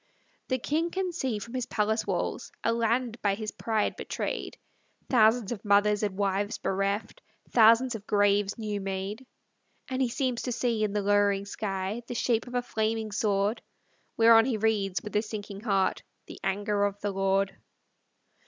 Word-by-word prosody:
The 260 - +1
king 315 +7 -1
can 370 +1 -2
see, 265 -10 -2
from 230 +4 -8
his 250 -2 -2
palace 220 -1 0
walls. - - -2
A 230 - +2
land 235 +1 0
by 200 -1 +2
his 215 0 -5
pride 220 -2 -1
betrayed; - - -4 0.5
Thousands 225 -2 +4
of 230 - -5
mothers 205 0 +3
and 205 -3 -2
wives 200 +1 0
bereft. 200 - -2 0.3
Thousands 230 +2 +6
of 220 -2 -8
graves 205 -1 +2
new 210 -2 -3
made. 195 +6 -4 0.6
And 260 0 -2
he 255 - +2
seems 255 -1 -1
to 250 - -3
see, 235 -2 0
in 210 -1 0
the 205 -1 0
lowering 205 -1 +2
sky, 200 +1 -3
The 245 - -5
shape 230 0 +1
of 245 - -7
a 245 - +1
flaming 220 -1 -1
sword; 205 +1 0 0.6
Whereon 225 0 +7
he 250 -4 0
reads, 200 -5 0
with 210 - -7
a 210 - +4
sinking 210 -2 -7
heart, 195 -4 +1 0.2
The - - -11
anger 205 +1 0
of 200 0 -3
the 205 - -1
Lord. 195 0 +1
215 Hz, 170 wpm, -28 LUFS, 200-235 Hz, 0.6 s, Whereon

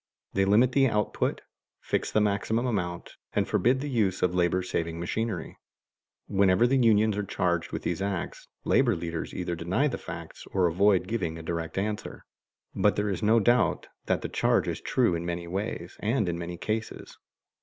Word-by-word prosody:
They 95 0 +2
limit 110 +6 +4
the 135 0 +4
output, 105 -3 -1 0.4
fix - - -1
the - - +3
maximum 105 +3 0
amount, 90 -8 -3 0.2
and - - +1
forbid 130 +3 +2
the 145 - -3
use 105 -9 0
of 90 -1 +2
labor 90 +1 +1
saving 85 -2 -3
machinery. 110 +6 -3 0.7
Whenever 100 +1 +4
the 135 +2 +3
unions 110 -3 +4
are 105 - -1
charged 85 -3 -1
with - - -4
these 85 +2 -2
acts, 100 -3 -3 0.2
labor 120 -5 +3
leaders 85 -1 -4
either 90 -1 -3
deny 90 - 0
the 130 - -3
facts 85 -1 -8
or 95 -2 +3
avoid 95 +2 +3
giving 90 -7 -2
a 80 - -8
direct 85 +1 -4
answer, 105 0 -3 0.5
but - - +2
there 105 0 0
is 95 - -3
no 110 +2 +4
doubt 120 +3 +2 0.2
that - - 0
the - - -1
charge - - +2
is - - -3
true 120 -8 +2
in 85 0 -2
many 85 0 -4
ways 90 -1 -4
and 110 -1 0
in 85 - -1
many 85 0 -5
cases. 110 +4 -4
95 Hz, 180 wpm, -27 LUFS, 85-110 Hz, 0.7 s, limit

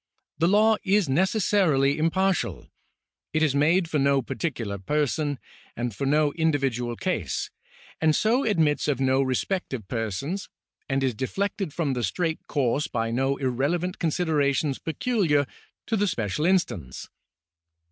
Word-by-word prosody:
The 165 - +3
law 215 +3 +4
is 200 -1 +2
necessarily 160 -3 +2
impartial. 190 +4 0 0.6
It 155 0 +2
is 150 -4 +2
made 165 +5 +3
for 155 -2 0
no 140 -1 +3
particular 115 -10 -3
person, 145 +4 0 0.4
and 120 -3 -3
for 135 - -2
no 150 0 +2
individual 135 -7 0
case, 115 - -2 0.5
and 155 -1 +3
so 240 +5 +2
admits 160 -10 +1
of 140 -4 0
no 130 0 +3
respect 135 +5 -1
of 110 -6 -8
persons, 120 - -3 0.4
and 135 0 0
is 130 -2 +1
deflected 195 - -2
from 150 -3 -1
the 125 -2 -2
straight 165 +2 -2
course 140 +2 0
by 115 -2 -2
no 135 +3 0
irrelevant 145 +8 -1
considerations 150 -4 +1
peculiar 165 - +1 0.4
to 225 - 0
the 205 -1 +1
special 120 - -1
instance. 130 - -1
150 Hz, 135 wpm, -25 LUFS, 130-180 Hz, 0.6 s, law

